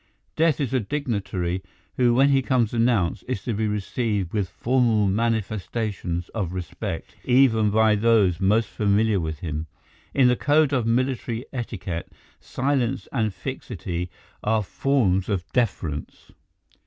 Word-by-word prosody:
Death 160 -2 +2
is 135 -3 -1
a 130 - +3
dignitary 100 -8 -2 0.3
who 120 -2 +3
when 135 +3 +5
he 135 -1 +4
comes 125 -4 +1
announced 115 -7 +1
is 125 -7 -3
to 120 - -2
be 110 +1 0
received 105 -2 -2
with 100 -4 0
formal 115 +2 +2
manifestations 105 -4 -1
of 95 -6 -3
respect, 90 -2 -5
even 125 -4 +4
by 110 +1 +4
those 105 -5 +3
most 105 +4 +3
familiar 105 0 +2
with 80 -3 -4
him. 80 -1 -4 0.5
In 135 -2 +5
the 125 - +4
code 145 +2 +3
of 125 -4 +1
military 125 0 0
etiquette 95 -9 -5 0.3
silence 130 -1 -1
and 110 -5 0
fixity 90 -1 -5 0.3
are 110 0 +2
forms 100 -5 +1
of 95 -4 -1
deference. 95 - -2
110 Hz, 135 wpm, -24 LUFS, 95-125 Hz, 0.5 s, when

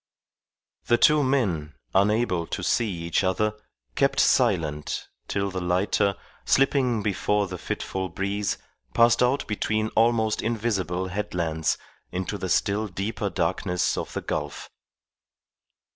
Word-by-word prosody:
The 120 - +4
two 150 +5 +5
men, 95 - 0 0.2
unable 100 -3 +2
to - - -4
see 115 -2 +1
each 85 0 -1
other, 105 +3 +1 0.4
kept - - +2
silent 75 -2 +1 0.2
till 100 0 -1
the 95 0 -3
lighter, 95 +3 +1 0.3
slipping 130 -5 +2
before 105 0 +1
the 90 -2 -7
fitful 95 +2 -3
breeze, 100 +3 -2 0.4
passed 115 0 +5
out 125 +3 +2
between 110 +1 -1
almost 110 -1 +2
invisible 100 -5 -1
headlands 85 -5 -1 0.3
into 95 +3 -3
the 95 - -3
still 105 +4 +1
deeper 100 +2 -3
darkness 90 0 0
of - - -4
the - - -3
gulf. 75 -1 -4
100 Hz, 120 wpm, -25 LUFS, 90-110 Hz, 0.4 s, two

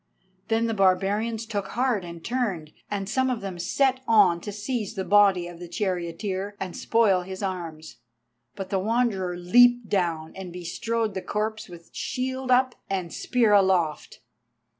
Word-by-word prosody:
Then 225 0 +1
the 225 - 0
barbarians 205 +4 +1
took 205 -3 -3
heart 240 -4 0
and 170 -1 -9
turned, 200 -11 -2 0.2
and 200 -2 -3
some 260 +4 +1
of 245 -3 -2
them 190 -3 -6
set 260 +8 +1
on 195 -7 +5
to 205 - -6
seize 210 +1 -3
the 190 - -2
body 200 -4 +4
of 175 -1 -10
the 175 - -8
charioteer, 185 +2 -3
and 185 -2 -5
spoil 215 -5 +2
his 190 +2 -7
arms. 170 -5 -5 0.6
But 195 -1 -6
the 195 - +1
Wanderer 200 -4 0
leaped 245 +6 +5
down 170 -5 -1
and 190 -2 -7
bestrode 215 +6 -2
the 190 - -3
corpse 215 +1 -3
with 170 -1 -13
shield 260 +1 -3
up 255 0 +4 0.2
and 185 -3 -3
spear 235 -4 +2
aloft. 185 -6 +2
200 Hz, 160 wpm, -25 LUFS, 180-230 Hz, 0.6 s, on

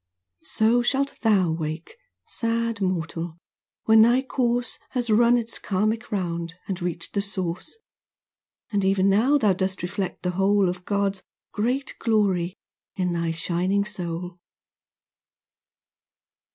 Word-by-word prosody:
So 225 +3 +3
shalt 275 +3 0
thou 200 -7 +3
wake, 160 - -4 0.3
sad 230 -1 -1
mortal, 170 -2 -2 0.5
when 220 0 +6
thy 240 +4 +5
course 245 -2 0
Has 245 -3 -1
run 235 +3 +5
its 235 -1 -3
karmic 215 +4 -1
round, 170 -4 -2
and 190 -2 -3
reached 170 -1 -3
the 200 - +1
Source, 185 - -5 0.9
And 200 -2 +1
even 195 0 +3
now 245 +9 +4
thou 215 -8 +3
dost 190 0 -2
reflect 190 +1 -3
the 180 - 0
whole 195 +1 +3
Of 180 0 -6
God's 200 -2 0 0.3
great 250 +6 -1
glory 195 -6 +1 0.4
in 180 -2 0
thy 170 -1 -1
shining 180 +5 0
soul. 175 -3 -5
200 Hz, 125 wpm, -25 LUFS, 180-230 Hz, 0.9 s, when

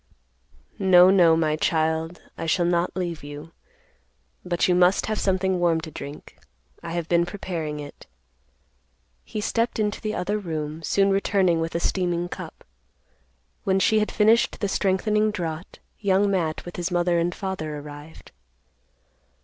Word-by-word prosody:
"No, 185 -1 +7
no, 170 -4 +5
my 155 -2 +1
child; 160 +1 -1
I 165 - -5
shall 175 +2 +2
not 175 0 0
leave 175 -5 -3
you. 145 +3 -9 0.9
But 175 -1 0
you 180 - +3
must 180 +2 +3
have 215 -1 -2
something 190 -1 +1
warm 170 -2 +2
to 160 -1 -8
drink. 145 0 -9 0.4
I 170 -1 -6
have 170 -2 -3
been 170 0 +3
preparing 170 -5 -4
it." 145 -1 -10 1.2
He 215 - -6
stepped 230 +2 0
into 210 -1 -1
the 215 0 -3
other 205 +4 -1
room, 155 -4 -4
soon 195 +5 +2
returning 195 -3 +2
with 165 +1 -3
a - - +1
steaming 175 -1 -1
cup. - - -9 1.0
When 190 0 +2
she 215 +3 +3
had 210 - -1
finished 220 +2 +3
the 200 - 0
strengthening 210 +3 +1
draught, 170 -4 -5 0.2
Young 200 0 +2
Matt, 165 -5 -1
with 175 - -8
his 175 +1 -2
mother 175 -1 +1
and 170 +1 -1
father, 155 -6 -4
arrived. 145 +2 -11
175 Hz, 150 wpm, -24 LUFS, 160-195 Hz, 1.2 s, No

